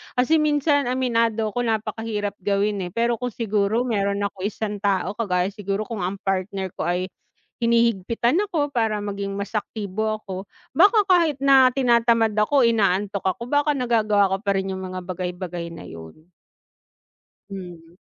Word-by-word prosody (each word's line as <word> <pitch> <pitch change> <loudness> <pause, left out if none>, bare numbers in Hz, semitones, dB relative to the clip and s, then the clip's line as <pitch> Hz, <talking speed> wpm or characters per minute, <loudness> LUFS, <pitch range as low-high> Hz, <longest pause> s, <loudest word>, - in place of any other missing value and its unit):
kasi 270 +6 +3
minsan 290 -2 +2
aminado 230 -4 +1
ako 245 +2 -2
napakahirap 220 -1 -2
gawin, 200 -1 0
eh, - - -10
pero 235 0 +1
kung 250 - -2
siguro 215 0 0
meron 200 -4 0
ako 200 -1 -4
isang 210 -1 -4
tao, 195 -2 0
kagaya 190 -3 -1
siguro 200 0 -3
kung 225 -2 -6
ang 185 +2 -2
partner 190 -1 -2
ko 160 - -1
ay 180 +2 -1 0.5
hinihigpitan 235 - +2
ako 290 -5 -1
para 220 -3 +1
maging 200 -1 -4
mas 200 +2 -5
aktibo 215 0 -2
ako, 190 -2 -7 0.3
baka 405 - +5
kahit 335 -6 +3
na 270 -2 +6
tinatamad 235 -4 +3
ako, 240 +5 +3
inaantok 200 -3 +1
ako, 210 +5 -2
baka 290 +1 +1
nagagawa 215 -5 +2
ko - - +1
pa 200 - 0
rin 190 0 -3
'yung 190 - -6
mga 185 -1 -6
bagay-bagay 180 -1 -5
na 165 - -10
'yun. 80 - -12 1.2
Mhm. 175 -3 -10
210 Hz, 155 wpm, -23 LUFS, 195-240 Hz, 1.2 s, na